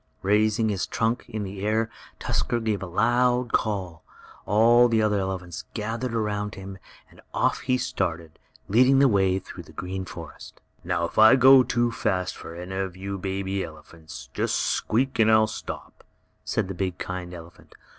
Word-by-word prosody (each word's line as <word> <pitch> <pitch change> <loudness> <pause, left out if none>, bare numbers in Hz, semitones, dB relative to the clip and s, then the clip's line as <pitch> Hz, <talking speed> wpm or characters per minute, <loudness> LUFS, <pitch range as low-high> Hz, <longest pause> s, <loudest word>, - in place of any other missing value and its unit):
Raising 110 +3 +2
his 100 -3 -1
trunk 115 +2 -1
in 110 -1 -4
the 95 0 -6
air 110 +2 +1 0.3
Tusker 120 - -1
gave 110 -3 -1
a 95 - -5
loud 120 +5 +1
call. 95 -6 -1 0.4
All 115 +4 +5
the 115 -2 +2
other 105 -2 +2
elephants 95 -2 -4
gathered 115 +2 -3
around 105 -2 -2
him, 95 0 -9 0.3
and - - -18
off - - +1
he 130 0 0
started, 85 -8 -3 0.3
leading 130 +6 +5
the 140 0 +6
way 95 -4 +2
through 95 - -9
the - - -15
green 95 +1 -5
forest. 85 -4 -10 0.2
"Now 85 - 0
if 85 - -3
I 110 +3 +8
go 130 0 +8
too 120 -1 0
fast 95 -5 -1
for 85 - -9
any 90 +2 -7
of 95 -2 -3
you 100 +1 -5
baby 95 0 -2
elephants, 80 -3 -11
just - - 0
squeak 130 +4 0
and 110 0 +5
I'll 110 0 +6
stop," 110 - -8 0.4
said - - -1
the 95 - -5
big, 90 -1 -3
kind 90 -1 -5
elephant. 85 -1 -13
105 Hz, 170 wpm, -25 LUFS, 95-115 Hz, 0.4 s, I